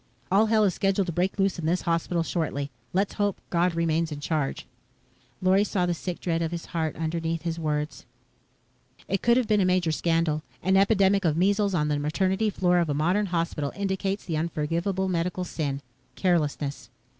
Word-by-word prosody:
"All 210 Hz, +4 st, +5 dB
hell 215 Hz, -1 st, +4 dB
is 195 Hz, -3 st, +3 dB
scheduled 195 Hz, +1 st, +1 dB
to 175 Hz, -, -4 dB
break 180 Hz, +5 st, 0 dB
loose 195 Hz, -2 st, +1 dB
in 160 Hz, -, -2 dB
this 175 Hz, +2 st, +1 dB
hospital 170 Hz, 0 st, 0 dB
shortly. 145 Hz, -4 st, -2 dB, 0.2 s
Let's 195 Hz, +2 st, 0 dB
hope 205 Hz, -2 st, 0 dB
God 175 Hz, 0 st, +2 dB
remains 165 Hz, -1 st, +1 dB
in 145 Hz, -, -5 dB
charge." 150 Hz, -2 st, -2 dB, 0.8 s
Lorry 190 Hz, +2 st, +4 dB
saw 190 Hz, -3 st, 0 dB
the 175 Hz, -, +1 dB
sick 175 Hz, +1 st, -5 dB
dread 165 Hz, -2 st, -1 dB
of 165 Hz, -, 0 dB
his 170 Hz, 0 st, -5 dB
heart 160 Hz, -2 st, -1 dB
underneath 165 Hz, +1 st, -2 dB
his 170 Hz, -1 st, -2 dB
words. 150 Hz, -1 st, -3 dB, 1.0 s
It 195 Hz, -, -1 dB
could 235 Hz, +1 st, +4 dB
have 250 Hz, -3 st, +1 dB
been 210 Hz, -2 st, +3 dB
a -, -, +4 dB
major 180 Hz, -3 st, +2 dB
scandal. 165 Hz, -1 st, +1 dB, 0.2 s
An 190 Hz, +2 st, +3 dB
epidemic 195 Hz, 0 st, +4 dB
of 160 Hz, -3 st, +1 dB
measles 200 Hz, +2 st, +2 dB
on 150 Hz, -3 st, +1 dB
the 150 Hz, -1 st, 0 dB
maternity 190 Hz, +8 st, +1 dB
floor 180 Hz, -3 st, +2 dB
of 170 Hz, -2 st, 0 dB
a 145 Hz, -, 0 dB
modern 180 Hz, +8 st, +1 dB
hospital 165 Hz, -5 st, -1 dB
indicates 195 Hz, 0 st, -2 dB
the 160 Hz, -3 st, -2 dB
unforgivable 170 Hz, +4 st, -1 dB
medical 180 Hz, 0 st, -1 dB
sin 145 Hz, -5 st, -3 dB, 0.3 s
carelessness. 150 Hz, -5 st, 0 dB
175 Hz, 185 wpm, -26 LUFS, 160-190 Hz, 1.0 s, All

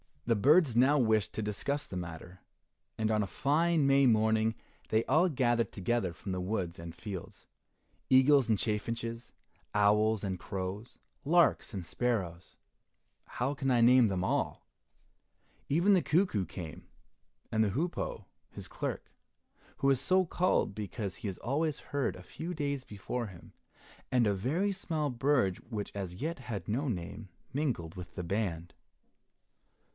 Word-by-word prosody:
The 115 Hz, -, +3 dB
birds 145 Hz, -, +4 dB
now 135 Hz, +4 st, +5 dB
wished 110 Hz, -5 st, +2 dB
to -, -, -3 dB
discuss 125 Hz, +8 st, -2 dB
the 90 Hz, -, -6 dB
matter, 85 Hz, +1 st, -7 dB, 0.6 s
and 110 Hz, 0 st, 0 dB
on 105 Hz, -1 st, +2 dB
a 100 Hz, -, -1 dB
fine 155 Hz, -, +2 dB
May 135 Hz, 0 st, +5 dB
morning 110 Hz, 0 st, +3 dB, 0.3 s
they 110 Hz, +1 st, +2 dB
all 160 Hz, +7 st, +4 dB
gathered 120 Hz, -5 st, +1 dB
together 100 Hz, -1 st, 0 dB
from 95 Hz, +2 st, -7 dB
the 95 Hz, -, -2 dB
woods 90 Hz, -3 st, -3 dB
and 85 Hz, 0 st, -8 dB
fields: 95 Hz, -2 st, -8 dB, 0.6 s
eagles 130 Hz, 0 st, +6 dB
and 110 Hz, -, +3 dB
chaffinches, 115 Hz, +2 st, -3 dB, 0.4 s
owls 105 Hz, +1 st, +3 dB
and 95 Hz, -3 st, -2 dB
crows, 95 Hz, +4 st, -5 dB, 0.3 s
larks 170 Hz, -5 st, +3 dB
and 95 Hz, -4 st, -5 dB
sparrows, 95 Hz, -5 st, -2 dB, 0.7 s
how 130 Hz, +4 st, -2 dB
can 135 Hz, -1 st, -2 dB
I 120 Hz, -2 st, +4 dB
name 125 Hz, 0 st, +6 dB
them 95 Hz, -3 st, -1 dB
all? -, -, -1 dB, 1.0 s
Even 175 Hz, +8 st, +4 dB
the 185 Hz, -, +5 dB
cuckoo 160 Hz, -, +1 dB
came, 85 Hz, -4 st, -8 dB, 0.6 s
and 110 Hz, 0 st, +3 dB
the 105 Hz, -, +1 dB
hoopoe, 165 Hz, -, -2 dB, 0.2 s
his -, -, -9 dB
clerk, -, -, -4 dB, 0.7 s
who 140 Hz, -, +3 dB
is 135 Hz, -2 st, +3 dB
so 185 Hz, +6 st, +3 dB
called 175 Hz, -, +1 dB
because 100 Hz, -1 st, -5 dB
he -, -, -5 dB
is 95 Hz, -, -4 dB
always 150 Hz, +4 st, -1 dB
heard 140 Hz, -2 st, -2 dB
a 90 Hz, -, -11 dB
few 170 Hz, -, -6 dB
days 140 Hz, -4 st, -2 dB
before 110 Hz, +4 st, -4 dB
him, 90 Hz, -4 st, -13 dB, 0.6 s
and 125 Hz, -2 st, +4 dB
a 105 Hz, -, +2 dB
very 155 Hz, -, 0 dB
small 160 Hz, -6 st, -2 dB
bird 125 Hz, -7 st, +2 dB
which 105 Hz, -4 st, -4 dB
as 95 Hz, -3 st, -5 dB
yet 160 Hz, -, -3 dB
had 110 Hz, -8 st, -6 dB
no 130 Hz, +7 st, 0 dB
name, 100 Hz, -1 st, -5 dB, 0.2 s
mingled 125 Hz, -, -1 dB
with 90 Hz, -1 st, -9 dB
the 90 Hz, -, -4 dB
band. 85 Hz, -3 st, -2 dB
115 Hz, 150 wpm, -31 LUFS, 95-140 Hz, 1.0 s, eagles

